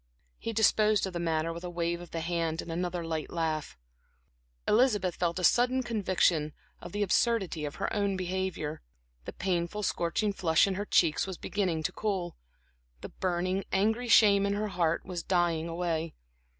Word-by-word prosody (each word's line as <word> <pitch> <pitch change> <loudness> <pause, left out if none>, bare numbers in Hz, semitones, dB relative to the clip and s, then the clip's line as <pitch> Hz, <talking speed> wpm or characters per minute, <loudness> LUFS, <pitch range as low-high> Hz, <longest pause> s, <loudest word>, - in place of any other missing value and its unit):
He 230 - -3
disposed 215 -1 +3
of 190 - -5
the 175 - -3
matter 165 -1 0
with 170 +1 -8
a 180 - -4
wave 170 0 -2
of 175 - -10
the 165 - -4
hand 165 -1 -1
and 170 - -7
another 175 0 -2
light 160 -1 -3
laugh. 160 - -2 0.9
Elizabeth 210 -6 +3
felt 170 0 -1
a 180 - -3
sudden 250 +7 +3
conviction 185 -9 +1 0.3
of 175 - -8
the 205 +2 0
absurdity 195 -6 +1
of 145 - -5
her - - -3
own 200 -2 0
behavior. 185 -4 -3 0.4
The - - -6
painful, 180 +2 -2
scorching 195 +3 0
flush 160 -4 +3
in 195 - -1
her 205 +2 -3
cheeks 165 -3 +2
was 190 -2 -5
beginning 180 -6 -1
to - - -1
cool; 190 -5 -2 0.7
the - - -7
burning, 185 +1 -1
angry 220 +5 +1
shame 200 -3 +6
in 200 - 0
her 210 +1 -2
heart 170 -3 0
was 180 -2 -4
dying 170 -2 +1
away. 165 -1 -2
180 Hz, 175 wpm, -29 LUFS, 165-200 Hz, 0.9 s, shame